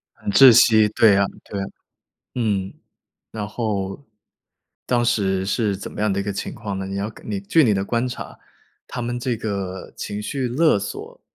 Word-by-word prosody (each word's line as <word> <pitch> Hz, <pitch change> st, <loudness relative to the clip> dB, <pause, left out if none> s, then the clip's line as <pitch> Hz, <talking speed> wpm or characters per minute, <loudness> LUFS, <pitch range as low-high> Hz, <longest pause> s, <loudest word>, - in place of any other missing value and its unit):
很 -, -, -4 dB
窒 135 Hz, -3 st, +9 dB
息， 110 Hz, -1 st, +6 dB
对 110 Hz, -1 st, +5 dB
呀， 100 Hz, 0 st, +3 dB, 0.2 s
对 100 Hz, -, -6 dB
呀。 -, -, -2 dB, 0.7 s
嗯， 100 Hz, -5 st, -1 dB, 0.6 s
然 105 Hz, -2 st, -4 dB
后 105 Hz, +1 st, -3 dB, 0.8 s
当 120 Hz, -1 st, +1 dB
时 95 Hz, -5 st, +1 dB
是 105 Hz, 0 st, 0 dB
怎 100 Hz, -, -8 dB
么 -, -, -6 dB
样 105 Hz, -2 st, +2 dB
的 100 Hz, -, -1 dB
一 -, -, -1 dB
个 100 Hz, -, -2 dB
情 -, -, -4 dB
况 100 Hz, -4 st, -5 dB
呢？ 95 Hz, -, -4 dB
你 95 Hz, -, -5 dB
要 100 Hz, +2 st, -2 dB
根 110 Hz, -, -12 dB
你 100 Hz, -2 st, -2 dB
据 150 Hz, +11 st, +3 dB
你 110 Hz, -4 st, +3 dB
的 95 Hz, 0 st, 0 dB
观 120 Hz, +3 st, 0 dB
察， 125 Hz, -, -7 dB, 0.5 s
他 125 Hz, -, -5 dB
们 120 Hz, +1 st, -3 dB
这 125 Hz, -1 st, -1 dB
个 100 Hz, -4 st, -5 dB
情 105 Hz, +1 st, -5 dB
绪 130 Hz, +3 st, -2 dB
勒 150 Hz, 0 st, +3 dB
索 100 Hz, -, -7 dB
105 Hz, 205 characters per minute, -22 LUFS, 100-120 Hz, 0.8 s, 窒